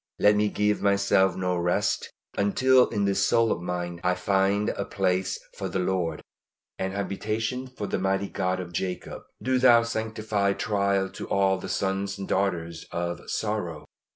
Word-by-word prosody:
Let 105 0 +5
me 105 0 +2
give 105 0 +1
myself 100 -1 +3
no 90 -1 -1
rest 90 0 0 0.3
until 125 +6 +4
in 105 -3 0
this 100 0 +2
soul 115 +1 +3
of 85 - -1
mine 85 -1 -4
I 90 0 +2
find 100 +2 +1
a 100 - -2
place 95 -1 0 0.2
for - - -4
the - - -2
Lord, 90 -2 -1 0.6
an 95 0 -2
habitation 110 +5 -2
for 125 -5 -6
the - - -2
mighty 95 +1 0
God 95 0 -1
of 85 -1 -7
Jacob. 90 +1 -4 0.2
Do 130 0 +2
Thou 120 -2 +6
sanctify 110 -3 -1
trial 100 -2 +1
to - - -8
all 95 -1 +2
the - - -7
sons 95 +1 -1
and 95 - -5
daughters 85 -4 -1
of 85 0 -3
sorrow. 95 -8 -2
100 Hz, 165 wpm, -26 LUFS, 90-105 Hz, 0.6 s, Thou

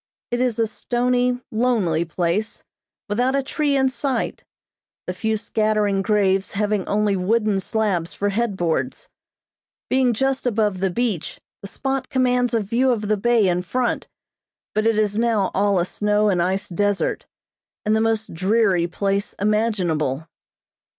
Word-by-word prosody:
It 240 - 0
is 250 -3 +1
a 230 - +2
stony, 245 +2 0
lonely 215 -9 +1
place, 180 +6 -2 0.4
without 245 +5 +1
a 275 - +1
tree 285 +1 0
in 265 0 +3
sight; 260 +1 -2 0.6
the - - -3
few 220 -1 -1
scattering 210 -2 +1
graves 195 -2 +1
having 210 -1 0
only 205 -1 +1
wooden 210 +2 +1
slabs 190 -5 -1
for 205 - 0
head 210 -1 -1
boards. 175 - -2 0.8
Being 255 -2 +3
just 270 +2 0
above 210 -5 +1
the 190 0 +1
beach, 215 -3 -2 0.2
the 200 - -7
spot 265 +5 -3
commands 250 -2 +1
a 225 - +2
view 235 +6 +1
of 210 -3 -2
the 215 - +3
bay 225 0 +3
in 180 0 +1
front, 245 +8 -1 0.7
but 215 +1 +1
it 225 -1 +2
is 210 0 +1
now 225 -5 +1
all 200 0 +2
a 175 - +2
snow 210 +2 +1
and 180 -3 +2
ice 190 +3 -1
desert, 205 +2 -1 0.6
and 215 +1 +3
the 220 - +2
most 225 -1 0
dreary 190 -1 +2
place 200 +2 -1
imaginable. 185 - 0
215 Hz, 150 wpm, -22 LUFS, 195-240 Hz, 0.8 s, in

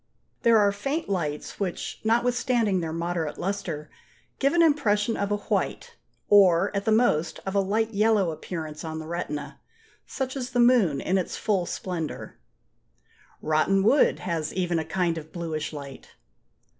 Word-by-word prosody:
There 230 -1 +5
are 205 -1 +4
faint 275 +10 -3
lights 155 -6 -3
which, 190 -4 -4
notwithstanding 235 -2 +1
their 160 -1 -3
moderate 165 -2 -3
lustre, 170 -6 -4 0.5
give 275 +2 +2
an 340 -1 +5
impression 225 -8 +2
of 200 0 -2
a 205 - +2
white, 205 - -2 0.3
or, 195 -1 +5
at 200 - -1
the 220 - +2
most, 175 -8 +2
of 195 - -3
a 200 - +3
light 220 +3 0
yellow 210 -4 +3
appearance 155 -1 -6
on 160 -1 -5
the 160 - -6
retina; 150 -3 -5 0.5
such 265 -1 -4
as 255 -2 -4
the 245 -1 -1
moon 235 - +4
in 190 +1 +1
its 180 - -4
full 190 -5 0
splendour. 170 -5 -5 1.0
Rotten 160 +6 +2
wood 265 +8 +4
has 165 -3 -2
even 175 -2 0
a 160 - -3
kind 170 -1 0
of 155 0 -13
bluish 160 -3 -4
light. 140 -3 -10
190 Hz, 155 wpm, -26 LUFS, 160-220 Hz, 1.0 s, There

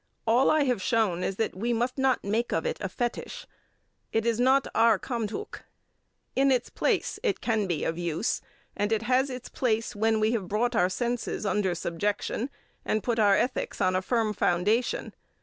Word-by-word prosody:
All 240 +4 +4
I 310 -1 +4
have 250 -7 0
shown 195 -5 +1
is 195 - -1
that 220 +2 -1
we 230 +6 -1
must 245 +3 -1
not 265 -1 +2
make 220 +4 -1
of - - 0
it 485 - -1
a - - -2
fetish. 240 -2 -4 0.7
It 225 0 0
is 235 -1 +1
not 265 +2 +4
our 225 -2 +5
Kamdhuk. 235 - -4 0.7
In 270 0 +4
its 255 - 0
place - - 0
it 435 -5 0
can 220 -4 0
be 170 -4 -1
of 165 +1 -2
use, 170 +4 -1 0.3
and 205 +1 -1
it 220 0 +1
has 255 +3 +2
its 250 -1 -6
place 230 -4 -1
when 220 +1 +2
we 215 +1 +2
have 215 -6 -2
brought 235 +5 0
our 180 -4 +3
senses 240 +2 -2
under 195 -2 +1
subjection, 205 +8 -2 0.3
and 215 - -1
put 235 -2 0
our 205 -2 +5
ethics 250 - -1
on 185 0 +2
a 185 - +1
firm 220 +1 0
foundation. 205 +7 0
225 Hz, 185 wpm, -27 LUFS, 205-245 Hz, 0.7 s, our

